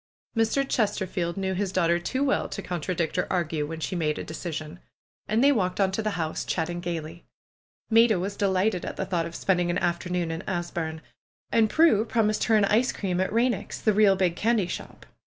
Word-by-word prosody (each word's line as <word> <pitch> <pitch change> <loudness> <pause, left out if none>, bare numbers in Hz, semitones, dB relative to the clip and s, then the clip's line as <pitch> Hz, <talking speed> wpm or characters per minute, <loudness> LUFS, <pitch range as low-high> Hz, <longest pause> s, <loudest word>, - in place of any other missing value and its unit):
Mr. 230 +5 +1
Chesterfield 190 -6 -1
knew 190 -1 -1
his 190 0 -1
daughter 170 -2 +2
too 260 +10 -1
well 280 - +1
to 200 - -5
con 175 -3 -4
tradict 170 +1 -1
or - - 0
argue 160 -4 -1
when 160 +1 -6
she 170 - -3
made 155 -3 0
a - - -4
decision. 160 0 -6 0.5
And 220 +4 +2
they 285 - +6
walked 185 -8 0
on 195 -1 +3
to 190 - -1
the 215 -3 -2
house, 160 -2 -2
chatting 175 +1 -2
gaily. 170 -1 -5 0.7
Maida 225 -3 +5
was 195 +3 -3
delighted 190 -1 +1
at - - -5
the 190 - -3
thought 175 -3 -1
of 170 - -10
spending 180 -2 +1
an 175 - 0
afternoon 175 -1 -1
in 165 +1 -4
Asburne. 170 -3 -3 0.5
And 225 -2 +4
Prue 315 -9 +4
promised 220 -2 +1
her 225 - +3
an 210 -2 +4
ice 230 +5 +2
cream 185 -3 -2
at 190 - 0
Eeineck's, 235 +3 0
the 215 - +2
real 200 -1 +5
big 185 -3 +1
candy 220 0 +2
shop. - - -7
185 Hz, 205 wpm, -26 LUFS, 170-215 Hz, 0.7 s, they